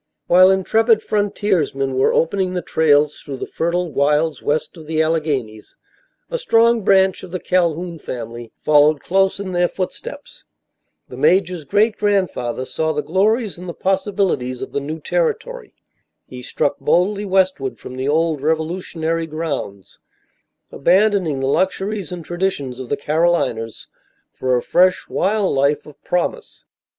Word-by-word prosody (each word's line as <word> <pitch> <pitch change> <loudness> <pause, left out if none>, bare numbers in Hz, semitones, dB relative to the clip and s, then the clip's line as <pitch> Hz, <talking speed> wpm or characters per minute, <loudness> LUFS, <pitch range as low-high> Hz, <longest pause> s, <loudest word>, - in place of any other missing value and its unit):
While 185 +1 +6
intrepid 220 +4 +3
frontiersmen 185 -10 0
were 130 - +3
opening 185 +2 0
the 180 - -2
trails 150 -2 +2
through 140 -2 -7
the - - -5
fertile 170 0 -2
wilds 150 +2 +1
west 155 +5 -1
of 160 -3 -12
the 160 0 -1
Alleghanies, 150 -9 -1 0.6
a - - -2
strong 235 - +3
branch 190 -1 +3
of 185 - -10
the 185 +1 -4
Calhoun 170 -2 0
family 120 -3 -7
followed 150 0 +5
close 195 +1 +1
in 195 -2 -5
their 175 0 +2
footsteps. 195 +11 -7 0.6
The - - -10
major's 180 -4 +2
great 210 +9 +2
grandfather 185 - -1
saw 160 +5 -2
the 150 0 -2
glories 205 +3 0
and 180 0 -8
the 170 - -6
possibilities 190 - -1
of - - -8
the - - -1
new 155 +3 -5
territory. - - -2 0.5
He 125 -1 -10
struck 130 - -2
boldly 200 +4 +1
westward 185 -8 0
from 130 - -9
the 130 +1 -3
old 160 -1 +1
revolutionary 160 +1 -2
grounds, 150 - -5 0.7
abandoning 180 -3 +2
the 135 - 0
luxuries 190 +4 -1
and 175 -3 -7
traditions 175 -8 -2
of 130 - -7
the 145 - 0
Carolinas 150 -7 0 0.5
for 130 -1 0
a 120 - -3
fresh, 185 +1 +2
wild 200 0 0
life 140 +2 +1
of 150 - -16
promise. 440 - -3
170 Hz, 145 wpm, -19 LUFS, 145-190 Hz, 0.7 s, While